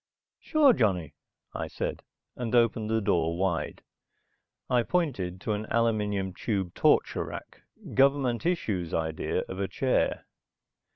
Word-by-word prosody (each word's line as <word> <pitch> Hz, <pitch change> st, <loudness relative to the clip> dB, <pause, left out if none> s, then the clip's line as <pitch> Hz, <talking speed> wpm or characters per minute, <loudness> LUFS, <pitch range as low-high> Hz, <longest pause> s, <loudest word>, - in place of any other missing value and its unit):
"Sure, 300 Hz, -5 st, +4 dB
Johnny," 90 Hz, -, 0 dB, 0.4 s
I -, -, -3 dB
said, -, -, -4 dB, 0.3 s
and 120 Hz, -1 st, -2 dB
opened 115 Hz, -2 st, +2 dB
the 110 Hz, 0 st, +1 dB
door 85 Hz, -4 st, +1 dB
wide. 90 Hz, -3 st, -1 dB, 0.8 s
I 125 Hz, -1 st, +3 dB
pointed 115 Hz, -, -1 dB
to -, -, -2 dB
an 105 Hz, +1 st, -2 dB
aluminum 105 Hz, -5 st, 0 dB
tube 95 Hz, -5 st, -2 dB
torture -, -, +2 dB
rack, -, -, -9 dB, 0.3 s
government 135 Hz, -3 st, +3 dB
issue's 105 Hz, -, -1 dB
idea 80 Hz, -1 st, -1 dB
of 95 Hz, -, -6 dB
a 100 Hz, -, 0 dB
chair. 130 Hz, +4 st, 0 dB
110 Hz, 125 wpm, -28 LUFS, 95-125 Hz, 0.8 s, Sure